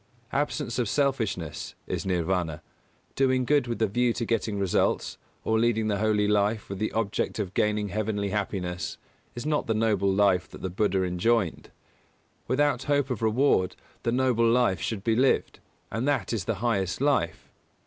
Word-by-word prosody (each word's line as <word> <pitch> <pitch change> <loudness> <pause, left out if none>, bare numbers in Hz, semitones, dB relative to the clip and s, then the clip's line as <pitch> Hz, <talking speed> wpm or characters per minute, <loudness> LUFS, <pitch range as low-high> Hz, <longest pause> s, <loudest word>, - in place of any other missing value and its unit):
Absence 145 -3 -1
of 120 -4 0
selfishness 110 - -1
is - - -3
Nirvāna. 90 -3 -1 0.5
Doing 130 -1 +2
good 145 -2 +2
with 120 - -2
the 110 - +2
view 120 +3 +1
to 115 - -3
getting 110 -2 -1
results, 95 -3 0 0.2
or 110 0 +1
leading 110 -2 +2
the 100 -2 0
holy 105 -1 +2
life 105 +1 +1
with 100 -1 -5
the 110 - -1
object 110 -2 -1
of 100 -4 -3
gaining 105 -1 +1
heavenly 105 0 -1
happiness, 95 -4 -3 0.4
is 120 - -5
not 150 -1 0
the 110 - +1
Noble 105 -3 +2
Life 95 -2 +2
that - - -12
the 95 - -2
Buddha 95 0 +1
enjoined. 90 +1 0 0.8
Without 145 +2 +1
hope 145 -2 +1
of 115 - -3
reward 110 -4 +2 0.3
the 115 - 0
Noble 120 -2 +2
Life 115 -8 +2
should 100 0 -3
be 115 0 +2
lived, 130 +3 +2 0.3
and 115 +5 -2
that 140 -5 0
is 105 -5 -2
the 115 - -1
highest 95 -6 0
life. 140 -4 0
110 Hz, 170 wpm, -27 LUFS, 100-120 Hz, 0.8 s, Doing